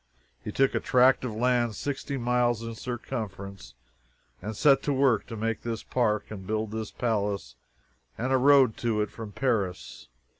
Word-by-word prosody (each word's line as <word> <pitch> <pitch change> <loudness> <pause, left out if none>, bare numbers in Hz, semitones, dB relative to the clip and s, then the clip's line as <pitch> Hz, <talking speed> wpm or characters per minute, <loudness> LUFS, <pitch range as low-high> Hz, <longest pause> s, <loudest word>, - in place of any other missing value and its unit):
He - - -4
took 135 0 +2
a - - +1
tract 130 +1 +4
of 120 -4 -3
land 120 -1 +1
sixty 140 +3 -3
miles 120 -2 +1
in 115 0 -5
circumference 100 - -6 0.7
and 110 0 -5
set 135 -2 +5
to 145 - -1
work 130 -5 +2
to 115 - -6
make 115 0 -2
this 115 -1 -4
park 110 -5 0
and 95 -3 -8
build 110 0 -2
this 110 -1 -4
palace 100 - -2 0.6
and 130 +3 -1
a - - +5
road 135 -3 +5
to 115 -3 0
it 105 - -2
from 110 -2 -8
Paris. 100 - -2
115 Hz, 165 wpm, -27 LUFS, 105-125 Hz, 0.7 s, set